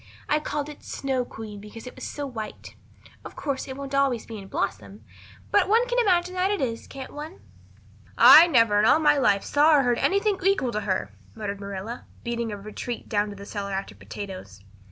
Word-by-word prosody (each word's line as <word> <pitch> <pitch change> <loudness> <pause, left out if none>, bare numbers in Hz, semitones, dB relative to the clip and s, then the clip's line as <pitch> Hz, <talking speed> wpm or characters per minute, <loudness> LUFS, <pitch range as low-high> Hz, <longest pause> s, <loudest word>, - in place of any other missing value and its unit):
I 300 - +2
called 295 -1 -3
it 300 -1 -11
Snow 265 -2 -2
Queen 220 -3 -9
because 210 +3 -11
it 250 - -8
was - - -11
so 290 - -5
white. 225 -5 -7 0.5
Of - - -10
course, 280 -3 -3
it 265 0 -7
won't 280 0 -7
always 275 -4 +1
be 225 -2 -8
in 195 - -10
blossom, 200 +1 -4 0.5
but 400 -2 +3
one 460 +3 +4
can - - 0
imagine 365 -5 +2
that 370 +1 +1
it 410 -1 0
is, 230 -3 -3
can't 270 -1 -9
one?" 305 +5 -8 0.8
"I 330 +3 +10
never 230 -9 +4
in 210 - +3
all 265 - +6
my 295 -2 +3
life 200 -7 +3
saw 300 +2 +4
or 275 - +3
heard 245 -2 +1
anything 400 0 +1
to 375 - -8
equal 325 -12 +1
her," 200 -3 -2 0.2
muttered 205 -2 -5
Marilla, 200 +4 -6 0.2
beating 235 -1 -2
a 205 - -5
retreat 215 +4 -6
down 205 -1 +1
to 205 - -8
the 200 0 -10
cellar 200 -1 -5
after 195 +1 -4
potatoes. 185 - -9
245 Hz, 205 wpm, -25 LUFS, 210-300 Hz, 0.8 s, I